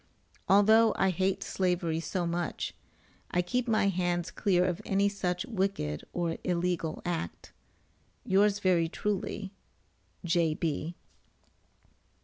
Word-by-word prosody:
Although 220 Hz, +3 st, +6 dB
I 190 Hz, -1 st, +3 dB
hate 190 Hz, +2 st, 0 dB
slavery 175 Hz, -3 st, 0 dB
so 175 Hz, +1 st, -2 dB
much, 170 Hz, 0 st, -2 dB, 0.6 s
I 180 Hz, -, +1 dB
keep 245 Hz, +7 st, -1 dB
my 220 Hz, -3 st, +3 dB
hands 175 Hz, -1 st, -1 dB
clear 180 Hz, -3 st, +2 dB
of 180 Hz, +2 st, -1 dB
any 200 Hz, 0 st, +2 dB
such 180 Hz, -3 st, -2 dB
wicked 190 Hz, -, -2 dB
or 170 Hz, -2 st, -2 dB
illegal 175 Hz, -2 st, -1 dB
act.] 165 Hz, -, -4 dB, 0.7 s
Yours, 200 Hz, +2 st, +3 dB
very 180 Hz, -5 st, +2 dB
truly, 200 Hz, +1 st, -3 dB, 0.7 s
J.B. 165 Hz, -1 st, 0 dB
180 Hz, 110 wpm, -30 LUFS, 170-195 Hz, 0.7 s, Although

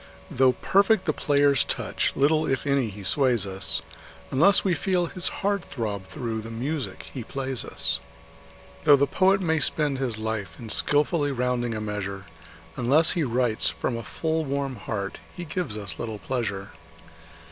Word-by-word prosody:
Though 130 Hz, 0 st, +3 dB
perfect 200 Hz, -, +2 dB
the 155 Hz, -, +1 dB
player's 140 Hz, -3 st, +3 dB
touch, -, -, -1 dB
little, 155 Hz, +3 st, +2 dB
if 135 Hz, +1 st, -1 dB
any, 140 Hz, -5 st, +1 dB
he 100 Hz, 0 st, -9 dB
sways 125 Hz, -1 st, +2 dB
us, 95 Hz, 0 st, 0 dB, 0.5 s
Unless 175 Hz, +9 st, +5 dB
we 190 Hz, -, +1 dB
feel 180 Hz, +3 st, 0 dB
his 180 Hz, +1 st, +1 dB
heart 200 Hz, -1 st, -1 dB
throb 105 Hz, -6 st, -5 dB
through 115 Hz, -1 st, -5 dB
the 115 Hz, -, -9 dB
music 135 Hz, +5 st, -5 dB
he 130 Hz, -, -5 dB
plays 135 Hz, +1 st, -3 dB
us. -, -, +1 dB, 0.8 s
Though 145 Hz, -, +7 dB
the 140 Hz, 0 st, +2 dB
poet 190 Hz, +6 st, +2 dB
may 160 Hz, -3 st, +1 dB
spend 150 Hz, -3 st, +2 dB
his 125 Hz, -5 st, 0 dB
life 110 Hz, -6 st, -4 dB
in 115 Hz, -, -9 dB
skilfully 145 Hz, +4 st, +3 dB
rounding 125 Hz, -2 st, -1 dB
a 110 Hz, -, -4 dB
measure, 100 Hz, -2 st, -5 dB, 0.5 s
Unless 140 Hz, +7 st, +5 dB
he 170 Hz, -, 0 dB
writes 120 Hz, -3 st, +1 dB
from 120 Hz, -, -3 dB
a 115 Hz, -, -4 dB
full, 160 Hz, +7 st, -2 dB
warm 140 Hz, -2 st, -3 dB
heart 100 Hz, -1 st, -5 dB, 0.2 s
he 175 Hz, -, -5 dB
gives 155 Hz, -, -3 dB
us 100 Hz, -6 st, -4 dB
little 110 Hz, -2 st, -4 dB
pleasure. 100 Hz, -4 st, -4 dB
130 Hz, 165 wpm, -25 LUFS, 110-155 Hz, 0.8 s, Though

